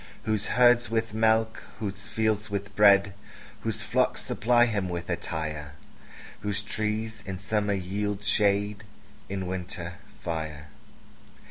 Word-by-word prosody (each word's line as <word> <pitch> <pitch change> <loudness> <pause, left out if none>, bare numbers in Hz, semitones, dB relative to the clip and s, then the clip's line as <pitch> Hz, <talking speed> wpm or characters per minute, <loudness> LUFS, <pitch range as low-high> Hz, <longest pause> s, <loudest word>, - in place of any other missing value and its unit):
Whose 110 -1 0
herds 120 -1 +5
with 115 -1 0
milk, 110 0 +2 0.2
whose 100 -2 -4
fields 110 -1 0
with 100 0 -4
bread, 100 -1 +6 0.5
Whose - - -2
flocks - - +1
supply 120 +1 +3
him 105 -5 -1
with 85 -1 -4
attire; 75 -2 -3 0.7
Whose 105 0 -2
trees 110 +1 -2
in 95 -1 -3
summer 105 +1 0
yield 100 +2 -2
shade, 105 0 +2 0.5
In 95 -1 -3
winter, 90 -1 -5 0.2
fire. 80 -3 -4
105 Hz, 120 wpm, -28 LUFS, 95-110 Hz, 0.7 s, bread